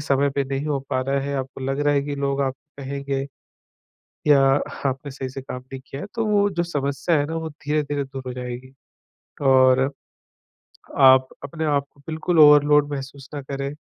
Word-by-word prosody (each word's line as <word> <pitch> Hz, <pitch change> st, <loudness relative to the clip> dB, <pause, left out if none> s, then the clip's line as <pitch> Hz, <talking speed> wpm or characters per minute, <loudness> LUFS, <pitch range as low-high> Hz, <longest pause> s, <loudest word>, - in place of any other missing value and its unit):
समय 140 Hz, 0 st, +2 dB
पे 140 Hz, -, +2 dB
नहीं 135 Hz, +2 st, -3 dB
हो 145 Hz, -2 st, 0 dB
पा 130 Hz, -, +1 dB
रहा 135 Hz, +1 st, 0 dB
है, 140 Hz, +1 st, -3 dB
आपको 130 Hz, 0 st, -5 dB
लग 135 Hz, +2 st, -1 dB
रहा 145 Hz, 0 st, +2 dB
है 140 Hz, -, +2 dB
कि 145 Hz, 0 st, -4 dB
लोग 140 Hz, 0 st, -1 dB
आपको 135 Hz, +1 st, -6 dB
कहेंगे। 140 Hz, 0 st, -3 dB, 1.0 s
या 145 Hz, -2 st, +6 dB, 0.5 s
आपने 135 Hz, +2 st, -4 dB
सही 130 Hz, 0 st, -5 dB
से 130 Hz, +1 st, -7 dB
काम 125 Hz, -1 st, -6 dB
नहीं 135 Hz, -, -6 dB
किया 135 Hz, -, -7 dB
हैं, 205 Hz, -, -7 dB
तो 230 Hz, -1 st, -1 dB
वो 205 Hz, -1 st, +3 dB
जो 175 Hz, -2 st, -1 dB
समस्या 145 Hz, 0 st, -1 dB
हैं 145 Hz, -, 0 dB
ना 160 Hz, +2 st, -4 dB
वो 160 Hz, 0 st, -4 dB
धीरे-धीरे 145 Hz, -1 st, -2 dB
दूर 135 Hz, -1 st, -8 dB
हो 125 Hz, -, -3 dB
जाएगी। 125 Hz, +1 st, -7 dB, 0.7 s
और 130 Hz, 0 st, +5 dB, 1.1 s
आप 130 Hz, -1 st, +7 dB, 0.2 s
अपने 160 Hz, +3 st, -4 dB
आप 145 Hz, -2 st, +1 dB
को 140 Hz, -, -23 dB
बिल्कुल 160 Hz, +2 st, 0 dB
ओवरलोड 150 Hz, -1 st, +6 dB
महसूस 135 Hz, 0 st, -7 dB
ना 145 Hz, -, -4 dB
करें। 140 Hz, 0 st, -4 dB
140 Hz, 190 wpm, -23 LUFS, 135-145 Hz, 1.1 s, आप